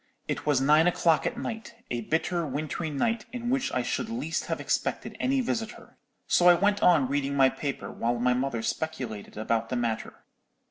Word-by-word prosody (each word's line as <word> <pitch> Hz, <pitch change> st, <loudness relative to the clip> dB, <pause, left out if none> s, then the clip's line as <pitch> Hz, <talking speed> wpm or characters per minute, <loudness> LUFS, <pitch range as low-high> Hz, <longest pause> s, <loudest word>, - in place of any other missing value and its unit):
It -, -, -3 dB
was 145 Hz, -3 st, +4 dB
nine 150 Hz, +5 st, +5 dB
o'clock 170 Hz, -2 st, +3 dB
at 240 Hz, -, -4 dB
night, 230 Hz, -2 st, -5 dB, 0.2 s
a 120 Hz, -1 st, -1 dB
bitter 170 Hz, +7 st, 0 dB
wintry 155 Hz, +3 st, -3 dB
night, 225 Hz, +10 st, -1 dB
in 245 Hz, -1 st, -3 dB
which 270 Hz, 0 st, 0 dB
I 125 Hz, -, 0 dB
should 220 Hz, -, -2 dB
least 165 Hz, -9 st, -3 dB
have -, -, -2 dB
expected -, -, -2 dB
any 265 Hz, +1 st, +1 dB
visitor. 225 Hz, -3 st, -4 dB, 0.3 s
So 175 Hz, -, +4 dB
I 175 Hz, -, +8 dB
went 205 Hz, +3 st, +1 dB
on 160 Hz, -7 st, +5 dB
reading 140 Hz, +1 st, -1 dB
my 135 Hz, -1 st, +6 dB
paper, 140 Hz, +1 st, -4 dB
while 120 Hz, +1 st, -1 dB
my 125 Hz, +1 st, +2 dB
mother 125 Hz, -2 st, -1 dB
speculated 125 Hz, -9 st, -4 dB
about 115 Hz, +1 st, -1 dB
the 125 Hz, -, -2 dB
matter. 115 Hz, -2 st, -3 dB
150 Hz, 185 wpm, -27 LUFS, 125-205 Hz, 0.3 s, I